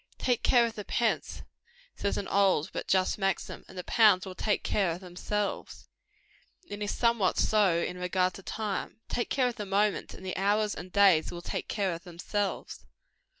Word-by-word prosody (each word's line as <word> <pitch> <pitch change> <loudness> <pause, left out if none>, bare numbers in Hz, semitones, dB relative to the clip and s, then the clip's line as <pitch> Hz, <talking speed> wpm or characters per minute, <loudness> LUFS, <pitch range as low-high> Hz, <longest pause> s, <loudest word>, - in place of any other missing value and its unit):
"Take 245 -2 0
care 240 -2 +5
of 230 - -3
the 210 -2 -6
pence," 230 +2 -1 0.5
says 200 - -1
an 200 - -3
old 190 -6 +2
but - - -4
just 190 +2 +2
maxim, 195 -2 -2
"and 185 - -13
the 180 - -4
pounds 210 -4 +4
will 190 - -7
take 210 +3 -1
care 195 -4 +1
of 165 +1 -3
themselves;" 195 +3 -4 0.8
and 205 0 -7
it - - 0
is 205 - -2
somewhat 230 -6 +2
so 205 -6 +3
in 180 +1 -3
regard 180 0 +1
to - - -10
time. 215 +2 -4
Take 240 - -2
care 260 -2 +2
of 245 - -8
the 210 - -4
moments, 200 +1 0
and 190 - -11
the 185 - -3
hours 205 +2 +1
and 180 +1 -8
days 195 -5 +5
will 175 0 -8
take - - -4
care 195 -4 -1
of 165 - -8
themselves. 195 +3 -4
200 Hz, 195 wpm, -29 LUFS, 185-210 Hz, 0.8 s, care